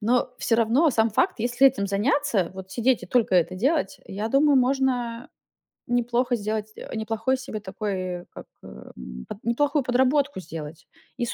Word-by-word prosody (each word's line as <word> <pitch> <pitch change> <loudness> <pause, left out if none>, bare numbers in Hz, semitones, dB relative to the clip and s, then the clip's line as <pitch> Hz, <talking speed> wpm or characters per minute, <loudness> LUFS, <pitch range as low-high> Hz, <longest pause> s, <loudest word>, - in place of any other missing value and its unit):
но 240 +3 +1
всё 225 - +1
равно 240 +8 +3
сам 225 -2 +2
факт, - - +1
если 245 +3 +4
этим 240 -7 +2
заняться, 205 - +1
вот 190 0 -9
сидеть 240 +4 +1
и - - -7
только 240 -6 +2
это 180 0 +3
делать, 255 - 0
я 205 +3 -4
думаю, 280 +3 +4
можно 250 -2 0 0.6
неплохо 245 +1 +1
сделать 215 0 -3
э, - - -10
неплохой 225 +4 -1
себе 255 -5 -6
такой 205 +1 -5
э, 180 -1 -4
как, - - -10 0.2
эм, 65 -1 -10
под 205 - -9
неплохую 285 +5 +1
подработку 260 +1 +2
сделать: 160 -2 -8 0.3
и 240 - -1
с - - -4
230 Hz, 170 wpm, -25 LUFS, 195-260 Hz, 0.6 s, если